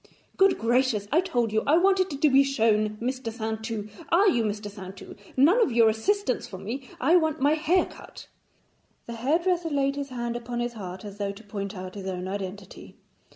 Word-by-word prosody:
'Good 390 0 +4
gracious, 235 -3 +1
I 325 +5 +4
told 240 - -1
you 220 - +2
I 305 +3 +5
wanted 380 +1 +3
to 305 - +4
be 270 +1 +7
shown 215 -5 +1
Mr. 255 -1 -3
Saintou. 220 -1 -4 0.2
Are 375 +5 +4
you 240 - +3
Mr. 210 -1 -3
Saintou? 195 -2 -10 0.2
None 335 - +5
of 360 - +3
your 230 -1 +5
assistants 260 - 0
for 190 - -8
me; 240 +7 -6
I 310 +8 +4
want 315 -2 0
my 285 +3 +3
hair 320 +4 +2
cut.' - - -12 0.8
The 235 - -7
hairdresser 330 +8 0
laid 275 -2 0
his 280 -1 -4
hand 240 -2 -4
upon 240 0 -4
his 240 0 -2
heart, 190 -3 -8
as 205 0 -9
though 200 -1 -2
to 210 +3 -14
point 200 -1 -5
out 185 0 -7
his 195 -2 -7
own 185 -1 -4
identity. 195 0 -7
235 Hz, 195 wpm, -26 LUFS, 210-290 Hz, 0.8 s, be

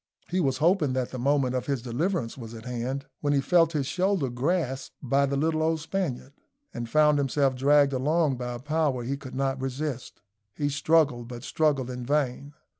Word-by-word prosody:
He 185 - +1
was 135 -6 +1
hoping 160 -2 +2
that 130 -1 -2
the 130 - -5
moment 135 0 +2
of 125 - -2
his 135 -5 -1
deliverance 130 +1 -1
was 115 -3 -9
at 110 +1 -10
hand, 125 +3 -3
when 145 -1 +1
he 140 - +3
felt 165 +3 +3
his 145 -3 0
shoulder 180 -2 0
grasped 135 0 -1
by 140 +1 +2
the 140 0 -1
little 155 +2 +1
old 160 0 +1
Spaniard, 155 -6 -3 0.4
and 120 -1 -5
found 150 +1 +4
himself 135 -1 +1
dragged 140 +1 +4
along 145 +1 +1
by 125 -1 -4
a - - -6
power 145 -2 0
he 135 +4 -2
could 140 -2 -9
not 135 0 -1
resist. 135 -3 -4 0.3
He 145 -1 0
struggled, 145 -4 +2
but 120 0 -8
struggled 140 -5 0
in 125 0 -5
vain. 140 +1 -1
140 Hz, 190 wpm, -27 LUFS, 125-155 Hz, 0.4 s, found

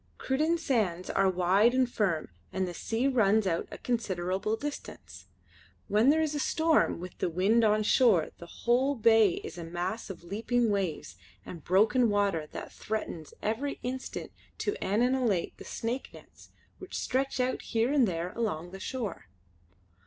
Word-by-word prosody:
Cruden 310 +6 +1
sands 205 - -1
are 195 0 +3
wide 190 +6 +3
and 260 -1 +3
firm 195 -9 -1 0.2
and 190 -1 -1
the 175 - -5
sea 225 +8 -1
runs 220 -5 +3
out 170 -3 -1
a - - -8
considerable 195 -3 -1
distance. 290 +5 -8 0.6
When 215 +6 +4
there 315 +2 +4
is 305 -1 -1
a 295 - -2
storm 315 - +2
with 180 +1 -9
the - - 0
wind 195 +7 +3
on 215 0 +3
shore 210 -8 +4
the 170 - -10 0.2
whole 255 +4 +3
bay 225 -4 +5
is - - -7
a - - -5
mass 175 +7 -4
of 180 -3 -8
leaping 225 +5 0
waves 175 - -2 0.3
and 170 - -9
broken 220 +6 +3
water 200 -7 +1
that - - -8
threatens 190 -7 -5
every 240 +7 -1
instant 260 +1 -5 0.3
to 415 - -1
annihilate 230 -2 +1
the - - -11
stake 240 +4 -3
nets - - -16 0.3
which 375 - -7
stretch 265 +1 -1
out 255 0 0
here 230 +4 0
and 270 -6 +4
there 175 0 -3
along 175 -7 -3
the 195 - -8
shore. 215 - -5
215 Hz, 160 wpm, -29 LUFS, 185-250 Hz, 0.6 s, bay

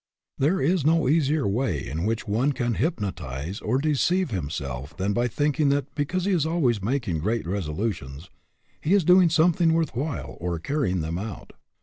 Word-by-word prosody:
There 160 +8 +2
is 165 +3 +2
no 160 -1 +3
easier 150 -1 +2
way 100 - -1
in 80 +8 -3
which 110 +1 -2
one 120 +8 +1
can 120 -2 -1
hypnotize 95 - -3
or 120 +5 0
deceive 155 +4 +1
himself 70 - -4
than 100 +2 0
by 120 +3 +1
thinking 145 +3 +1
that 140 0 -1
because 175 +5 -1
he 200 - +1
is 175 -6 +2
always 150 - +1
making 110 - -1
great 110 +6 -1
resolu 95 +3 -1
tions 70 +3 -11 0.5
he 175 +6 +3
is 200 - +3
doing 180 +1 +6
something 165 +1 +3
worth 165 -4 0
while 140 +2 -4
or 85 0 -2
carrying 95 - -1
them 80 +2 -3
out. 105 -2 -7
120 Hz, 180 wpm, -25 LUFS, -, 0.5 s, doing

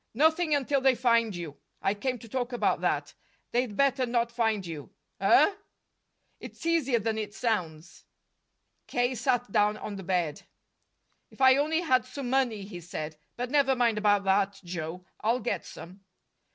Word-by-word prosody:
"Nothing 315 +3 +3
until 280 0 +1
they 265 -1 +4
find 230 -4 +2
you. 165 -5 -7 0.2
I 195 - +1
came 250 +5 -2
to 230 - -13
talk 245 +2 -3
about 245 - 0
that. - - -1 0.4
They'd 240 -4 -1
better 270 -2 +2
not 235 0 0
find 225 -4 0
you." 160 -4 -7 0.3
"Huh!" 410 - +5 0.9
"It's - - -10
easier 315 -7 +2
than 220 0 -1
it 210 0 -5
sounds." 170 -8 -3 0.8
K. 245 +1 0
sat 245 -2 0
down 210 +1 +2
on 205 -1 -6
the 195 - -7
bed. 175 -4 -1 0.9
"If - - -20
I 260 -1 +7
only 310 +4 +1
had 255 -7 +2
some 255 -1 -5
money!" 245 -6 +1
he 190 -3 -8
said. 155 -2 -6 0.2
"But 245 +1 -3
never 275 -2 +3
mind 235 -3 +2
about 205 -1 +3
that, 195 0 +1
Joe; 175 0 -6
I'll 230 +4 +1
get 245 - -3
some." 185 +4 -11
230 Hz, 165 wpm, -28 LUFS, 195-260 Hz, 0.9 s, I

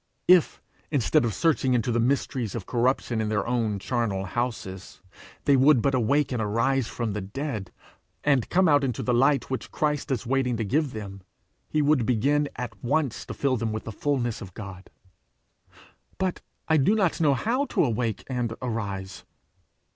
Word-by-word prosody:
If, 180 -2 +4 0.3
instead 145 0 +2
of 115 - 0
searching 140 -6 +2
into 120 +1 0
the 120 - +1
mysteries 125 -2 0
of 110 -6 -5
corruption 120 -1 0
in 110 - -1
their 105 -1 0
own 115 -4 0
charnel 100 -3 -1
houses, 95 -5 -4 0.5
they 140 - +5
would 135 0 +5
but 140 +4 +1
awake 135 +4 +2
and 120 -3 -1
arise 115 +4 +1
from 115 -4 -3
the 105 - -3
dead, 105 0 -5 0.5
and 140 -5 +2
come 185 +1 +3
out 145 -2 +4
into 125 -4 -2
the 125 - +1
light 135 +3 +2
which 130 - -3
Christ 150 -2 -1
is 130 -3 -1
waiting 125 -1 0
to 110 - -2
give 140 +5 0
them, 100 -3 -7 0.5
he 155 -1 +1
would 145 -4 +3
begin 140 +5 +2
at 115 -5 -7
once 130 -2 -1
to - - -6
fill 135 -2 +1
them 115 0 -2
with 110 0 -4
the 115 - -6
fulness 120 -1 -1
of 95 -2 -10
God. 100 -3 -9 1.3
'But 190 -1 -2 0.3
I 160 - +4
do 155 +10 +3
not 190 -6 +1
know 145 -3 +4
how 250 - 0
to - - +1
awake 115 -4 -1
and 120 -3 -2
arise!' 100 -6 -4
125 Hz, 175 wpm, -26 LUFS, 110-140 Hz, 1.3 s, they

